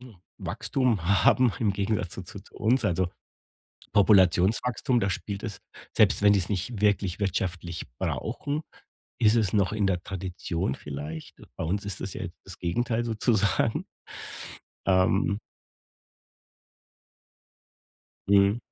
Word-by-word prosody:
hm, 125 -5 -13 0.2
Wachstum 125 -10 -1 0.2
haben 125 -3 +5
im 105 -3 +2
Gegensatz 100 -2 -1
zu - - -6
zu 100 - -9
zu 100 - -21
uns, 120 +5 +2
also 90 0 +1 0.8
Populationswachstum. 105 +5 +4
Da 100 - 0
spielt 100 +1 -4
es 100 -4 -5 0.4
selbst - - +5
wenn 105 0 +6
die 100 - +3
es 90 - -2
nicht 105 +3 -2
wirklich 100 -2 +1
wirtschaftlich 90 -3 -2
brauchen, 145 +2 -2 0.6
ist 110 -1 +5
es 110 -6 +2
noch 100 -1 +2
in 105 -2 +1
der 90 -3 0
Tradition 90 -5 -3
vielleicht. 75 +3 -7 0.2
Bei - - -4
uns 100 +6 -1
ist 100 -3 -4
es - - -4
ja - - -4 0.2
das - - -10
Gegenteil 115 +7 0
sozusagen. 110 -2 +1 1.0
Ähm. 95 +2 +3 2.9
Mhm. 100 +2 +5
100 Hz, 125 wpm, -27 LUFS, 95-110 Hz, 2.9 s, wenn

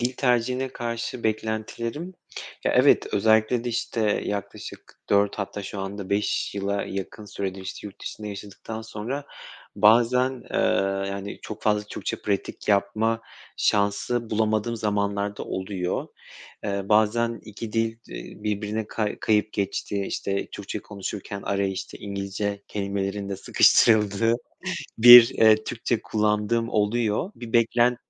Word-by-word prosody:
dil 125 +2 0
tercihine 125 +1 +1
karşı 115 0 -4
beklentilerim, 115 - -3 0.5
ya - - +2
evet, - - +5
özellikle 110 +3 +3
de, - - -1
işte, 115 0 -2
eee, 105 -2 +1
yaklaşık 100 -2 -7
4 100 +1 +3
hatta 100 0 -4
şu 100 0 -6
anda 95 0 -6
5 100 0 0
yıla 100 0 -1
yakın 100 +2 -6
süredir, 95 -2 -5
işte, 95 +2 -7
yurt 100 - -18
dışında 105 - -6
yaşadıktan 105 +2 -7
sonra 115 +6 -5 0.5
bazen, 120 +5 +5 0.2
eee, - - -2 0.5
yani, 100 +1 -5
çok 110 -1 -8
fazla 105 -1 +2
Türkçe - - -3
pratik 100 0 -3
yapma 110 +3 +2 0.4
şansı 105 +3 +1
bulamadığım 110 +1 0
zamanlar 100 -1 -1
da - - -5
oluyor. 95 -1 -3 0.6
Eee, 100 -1 -3
bazen 115 +2 +2
2 110 +1 -7
dil, 115 0 0
iii, - - -9
birbirine 105 +1 -2
ka 105 -2 -2
kayıp 105 0 +2
geçtiği, 100 0 -2
işte, 100 0 -2
Türkçe 100 +1 -5
konuşurken 100 0 -6
araya, 100 0 0
işte, 95 -1 -6
İngilizce 100 0 -4
kelimelerin 100 0 -3
de 100 - -2
sıkıştırıldığı 110 +3 +4 0.6
bir, 120 0 +11
eee, 110 -1 +4
Türkçe 120 0 -2
kullandığım 105 +2 0
oluyor. 110 - 0
Bir 120 -2 -9
beklen 120 +1 +3
105 Hz, 130 wpm, -25 LUFS, 100-115 Hz, 0.6 s, bir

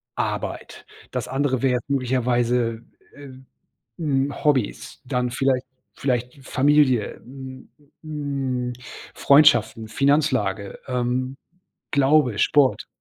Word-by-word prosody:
Arbeit. - - -4 0.3
Das - - -3
andere 135 -1 0
wäre 125 -2 +2
möglicherweise, 120 -3 0 0.3
äh, 140 -1 -12 0.7
hm, 140 -3 -1
Hobbys. 135 -8 0
Dann 125 -1 -1
vielleicht 130 0 0 0.3
vielleicht 125 +1 -3
Familie, 135 -5 +2
hm 130 0 -11 0.3
hm, 140 -5 -3 0.4
Freundschaften, 140 -5 +4
Finanzlage, 130 -6 0
ähm, 125 +1 -1 0.5
Glaube, 140 -5 +3
Sport. 140 +3 +3
130 Hz, 90 wpm, -23 LUFS, 125-140 Hz, 0.7 s, Freundschaften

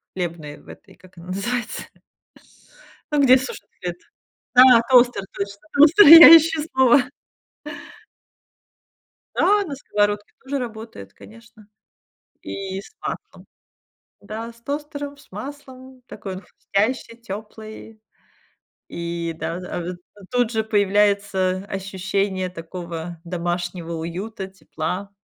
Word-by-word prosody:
хлебной, 165 -5 -5
в - - -23
этой, - - -15
как 185 -1 -21
она 170 +1 -12
называется? 230 +5 -3 1.3
Ну, 290 - +3
где 260 -1 +6
сушат 260 - -7
хлеб. 175 -1 -4 0.6
Да, 250 -2 +8
тостер, 245 -5 +4
точно, 200 0 -5
тостер, 310 +8 +7
я 330 +1 +12
ищу 320 0 -1
слово. 260 0 +4 2.3
Да, 410 0 +3
на 295 -6 -6
сковородке 205 -4 -1
тоже 280 +1 -3
работает, 220 - -8
конечно, 225 -1 -17 0.8
и 195 -1 -6
с - - -16
маслом. - - -7 0.8
Да, 225 +3 -7
с 230 - -23
тостером, 285 0 -5
с - - -21
маслом, 260 +2 -10
такой 190 -2 -8
он 190 - -9
хрустящий, 225 +5 -3
тёплый, 215 +1 -10 0.9
и 170 0 -4
да, 165 +1 -4
а, 180 -1 -6 0.3
а 200 - -15
тут 245 -2 +1
же 220 -1 -1
появляется 200 -2 +1
ощущение 190 -1 -3
такого 170 -1 -8
домашнего 175 0 -4
уюта, 190 +6 -6
тепла. 190 0 -6
205 Hz, 110 wpm, -22 LUFS, 185-250 Hz, 2.3 s, я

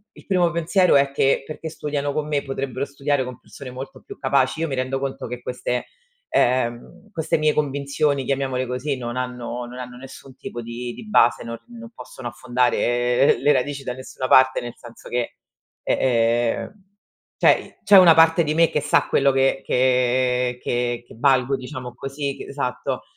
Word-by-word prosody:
il - - -16
primo 180 -3 +2
pensiero 170 +3 +3
è 140 0 +2
che: 135 0 +2
"Perché 155 +2 -7
studiano 145 -2 -3
con 150 0 -2
me, 145 -2 -1
potrebbero 135 -1 -4
studiare 140 -1 -1
con 125 -1 -8
persone 135 -3 -11
molto 130 +2 -9
più - - -10
capaci". 135 +2 +1
Io 165 - 0
mi 135 - -3
rendo 130 +1 -2
conto 135 -2 -4
che 125 +1 -6
queste 125 0 -3 0.5
ehm, 125 - 0
queste 160 -5 0
mie 155 -1 +2
convinzioni, 140 -1 0
chiamiamole 130 -1 -1
così, 130 +3 -2
non 120 -1 -5
hanno 125 -1 -4
non 120 +1 -10
hanno 125 -1 -8
nessun 135 0 -12
tipo 120 -2 -7
di 120 +1 -6
di 220 - -11
base, 120 - +4
non 115 0 -5
non 235 -1 -10
possono 130 - -9
affondare 120 +1 +1
le 145 - +3
radici 140 +1 -2
da 125 - -2
nessuna 130 0 -6
parte 130 0 +5
nel 120 -1 -7
senso 120 -1 -14
che 120 -1 -2 0.5
eh, - - +1
ehm, 120 +3 +1 0.6
cioè, - - +2
c'è 205 - +7
una 180 -3 +9
parte 165 +1 +5
di 150 -1 -1
me 165 0 +4
che 150 - -1
sa - - +2
quello 140 0 +3
che 135 0 +2
che 125 -1 +1
che 120 0 -1
che - - -15
valgo 130 +1 +3
diciamo 130 -1 -7
così 135 +2 -4
c - - -10
esatto. 135 -3 -3
130 Hz, 180 wpm, -22 LUFS, 125-145 Hz, 0.6 s, una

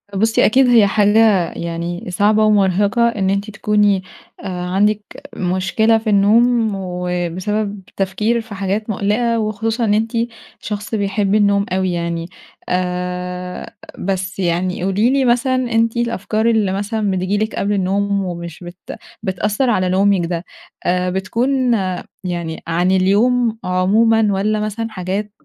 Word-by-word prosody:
بُصّي 220 +3 +3
أكيد 260 +3 +4
هي 230 -4 +6
حاجة 205 -3 +3
يعني 170 +1 -4
صعبة 210 +4 +3
ومُرهِقة، 205 +3 +3
إن 200 -5 -1
أنتِ 200 +2 -1
تكوني 210 -2 +1 0.4
آآ - - -5 0.2
عندِك 205 +3 +1 0.3
مشكلة 190 +5 +1
في 220 0 -3
النوم، 220 +3 +3
وبسبب 185 +3 -3 0.2
تفكير 210 +5 0
في 220 -2 -10
حاجات 200 +3 -2
مُقلِقة، 220 +3 0
وخصوصًا 220 +2 -1
إن 205 - +2
أنتِ 220 +1 0 0.5
شخص 210 +1 -4
بيحب 200 0 0
النوم 200 -1 +3
أوي 185 0 0
يعني 170 0 -3 0.4
آآ، 180 0 -3 0.3
بس 190 0 -3
يعني 180 0 -1
قولي 195 +5 +2
لي 270 0 +2
مثلًا، 245 +2 +2
أنتِ 230 -2 0
الأفكار 225 -2 -1
اللي 215 -4 +2
مثلًا 205 +1 -1
بتيجي 185 +2 -1
لِك 215 +1 -2
قبل 205 +1 0
النوم 200 +1 0
ومش 170 -2 -6
بت 175 +1 -9 0.3
بتأثّر 210 +6 0
على 185 -5 +1
نومِك 190 -1 +2
ده، 170 0 -3 0.4
آآ 180 +1 +1
بتكون 240 +7 0 0.5
يعني 170 -3 -4
عن 175 +2 +1
اليوم 220 +5 +2
عمومًا 215 +5 +3
والّا 210 +2 0
مثلًا 215 +2 -3
حاجات 200 +1 -4
200 Hz, 135 wpm, -18 LUFS, 185-220 Hz, 0.5 s, هي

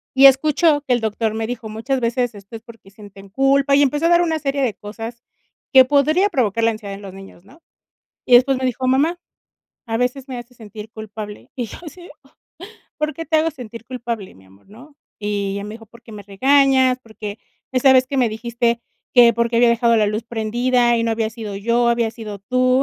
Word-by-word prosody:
Y 270 +1 +7
escuchó 290 +3 +4
que 260 -3 0
el 240 - 0
doctor 220 0 -1
me 220 0 -3
dijo: 235 -3 -6
"Muchas 250 +5 -2
veces 240 0 -1
esto 200 +3 -12
es 220 - -8
porque 230 -4 -16
sienten 200 -1 -14
culpa", 275 +4 +2
y 285 - +4
empezó 295 +3 +1
a - - +2
dar 345 0 +5
una 320 -2 0
serie 280 -1 -2
de 240 -6 0
cosas 225 +4 -9 0.5
que 260 -1 +8
podría 305 +8 +2
provocar 230 - 0
la 230 - +3
ansiedad 205 -3 -7
en 200 - -12
los 195 -2 -10
niños, 195 -1 -14
¿no? 310 +10 -20 0.7
Y 245 - +5
después 260 +2 +5
me 260 - -4
dijo: 255 0 -1
"Mamá, 295 +7 +1 0.7
a 225 0 -2
veces 250 +3 -2
me 255 -2 -5
hace 240 +1 -12
sentir 215 -1 -11
culpable", 215 -1 -9
y 245 - -3
yo - - -10
así: 350 +4 -11 0.9
"¿Por 305 0 -2
qué 330 - -6
te 320 - +1
hago 320 +1 +2
sentir 235 -5 -10
culpable 235 -5 -6
mi 95 0 -20
amor?", 95 - -23
¿no?, 260 +8 -16 0.2
Y 205 -1 -2
ella 200 0 -5
me 210 +1 -7
dijo: 225 -1 -13
"Porque 235 0 -16
me 205 -1 -9
regañas, 260 +4 +3
porque, 220 -2 -8 0.3
esa 260 +1 +4
vez 255 0 +4
que 275 - -4
me 250 -3 +3
dijiste 235 +1 -1 0.3
que 240 -2 +7
por 235 0 0
qué 235 - -1
había 240 0 +5
dejado 235 0 +3
la 210 -1 +3
luz 215 +2 -3
prendida 240 +2 +1
y 230 - 0
no 230 - 0
había 225 -1 -1
sido 220 -3 -7
yo, 235 +3 +1
habías 235 -1 0
sido 215 -3 -8
tú, 255 +5 +1
235 Hz, 220 wpm, -20 LUFS, 220-265 Hz, 0.9 s, que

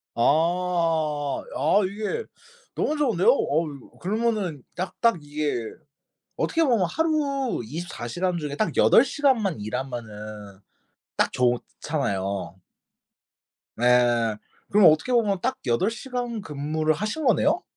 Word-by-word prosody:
아. 160 0 +1
아 205 - +3
이게 215 - -3 0.5
너무 305 - 0
좋은데요? 230 - +3
어우 155 - 0
그러면은 205 - -1
딱, 185 +2 -5
딱 230 -6 +4
이게 145 0 -2 0.8
어떻게 330 - +1
보면 235 - +3
하루 285 - 0
24 150 -1 -6
시간 175 +7 -1
중에 145 -2 -4
딱 215 - -1
8 235 - +6
시간만 240 - +1
일하면은 110 -4 -6 0.6
딱 - - +2
좋잖아요. 120 -6 -1 1.2
네. 120 -2 +3 0.4
그럼 205 -3 +7
어떻게 160 +11 0
보면 215 -6 +2
딱 260 +2 -1
8 120 - +2
시간 245 -3 -4
근무를 155 +1 -1
하신 215 - -3
거네요? 295 - +3
170 Hz, 215 characters per minute, -25 LUFS, -, 1.2 s, 그럼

